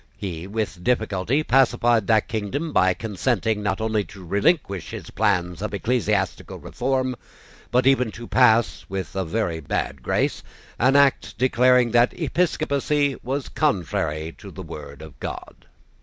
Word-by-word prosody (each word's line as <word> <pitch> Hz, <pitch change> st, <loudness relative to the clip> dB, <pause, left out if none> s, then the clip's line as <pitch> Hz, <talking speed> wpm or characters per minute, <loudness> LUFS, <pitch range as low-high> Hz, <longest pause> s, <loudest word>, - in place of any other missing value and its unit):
He 90 Hz, -3 st, -5 dB
with 105 Hz, -3 st, -4 dB
difficulty 110 Hz, +4 st, 0 dB
pacified 120 Hz, -5 st, +3 dB
that 110 Hz, -2 st, +3 dB
kingdom 115 Hz, +9 st, -3 dB
by 95 Hz, -1 st, +3 dB
consenting, 110 Hz, 0 st, -1 dB
not 95 Hz, -2 st, -1 dB
only 110 Hz, -1 st, 0 dB
to 95 Hz, -3 st, -12 dB
relinquish 100 Hz, -, 0 dB
his -, -, -8 dB
plans 90 Hz, -4 st, 0 dB
of 105 Hz, -1 st, -3 dB
ecclesiastical 105 Hz, -3 st, -1 dB
reform, 130 Hz, 0 st, -2 dB, 0.5 s
but 125 Hz, +2 st, +2 dB
even 130 Hz, -3 st, +3 dB
to 120 Hz, +2 st, -8 dB
pass, 120 Hz, -3 st, +3 dB
with 95 Hz, 0 st, -5 dB
a 95 Hz, -, 0 dB
very 85 Hz, -2 st, -2 dB
bad 70 Hz, -2 st, -3 dB
grace, -, -, 0 dB, 0.4 s
an 130 Hz, +4 st, +4 dB
act 140 Hz, -1 st, +3 dB
declaring 125 Hz, 0 st, +4 dB
that 120 Hz, +6 st, +3 dB
episcopacy 150 Hz, -3 st, 0 dB
was 135 Hz, +2 st, -3 dB
contrary 80 Hz, -, -1 dB
to -, -, -10 dB
the -, -, -9 dB
word 70 Hz, 0 st, -9 dB
of 80 Hz, -, -13 dB
God. -, -, -8 dB
110 Hz, 140 wpm, -23 LUFS, 95-130 Hz, 0.5 s, an